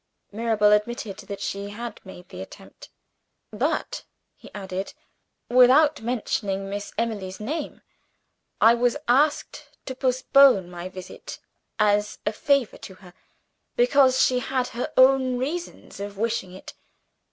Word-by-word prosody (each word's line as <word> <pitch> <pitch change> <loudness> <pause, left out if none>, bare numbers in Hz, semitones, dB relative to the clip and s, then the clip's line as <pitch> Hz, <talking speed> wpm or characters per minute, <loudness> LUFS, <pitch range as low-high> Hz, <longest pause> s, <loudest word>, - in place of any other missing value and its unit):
Mirabel 215 -1 +2
admitted 210 -1 0
that 200 -1 -6
she 200 +1 -4
had 230 +2 -7
made 180 -2 -13
the 90 - -9
attempt. 95 - -13 0.6
"But," - - -2 0.3
he - - -15
added, 190 -1 -6 0.5
"without 260 +5 +5
mentioning 205 -4 -2
Miss 205 0 -5
Emily's 205 -5 -3
name. 290 +8 -5 0.8
I 225 - +6
was 240 0 +1
asked 290 +5 +1 0.2
to 260 - -5
postpone 255 -6 +3
my 175 +1 -7
visit, 185 -1 -10 0.4
as 210 -1 +1
a 210 - 0
favor 275 +1 0
to 190 - -11
herself, 185 -2 -16 0.6
because 280 - +4
she 255 -1 +3
had 255 0 -2
her 245 0 -5
own 260 -1 +4
reasons 315 +8 -5
for 200 +1 -5
wishing 205 -2 -3
it. 190 - -11
225 Hz, 130 wpm, -24 LUFS, 200-255 Hz, 0.8 s, I